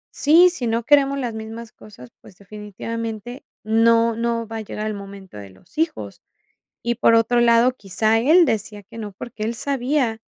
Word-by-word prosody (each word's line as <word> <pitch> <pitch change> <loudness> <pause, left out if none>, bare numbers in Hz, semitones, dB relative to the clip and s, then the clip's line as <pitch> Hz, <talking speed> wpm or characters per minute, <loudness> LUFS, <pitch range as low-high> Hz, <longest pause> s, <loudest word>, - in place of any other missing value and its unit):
Sí, 340 +5 +5
si 260 -9 -4
no 230 +1 -1
queremos 280 +1 +3
las 245 -4 -3
mismas 220 +1 -8
cosas, 125 - -15
pues, 185 - -17
definitivamente 215 +4 -7 0.2
no 230 +1 +3
no 230 0 -2
va 225 +1 -6
a - - -4
llegar 215 0 -6
el 215 - -2
momento 195 - -11
de 100 -1 -10
los 95 - -23
hijos. 320 -1 -3 0.6
Y 235 0 -1
por 230 0 +3
otro 230 +1 +2
lado, 235 +1 +4
quizá 215 0 0
él 325 +8 +5
decía 210 -3 -3
que 205 +4 -14
no 210 -2 -6
porque 215 +2 -8
él 230 +2 -2
sabía, 255 -3 -1
230 Hz, 180 wpm, -21 LUFS, 215-240 Hz, 0.6 s, Sí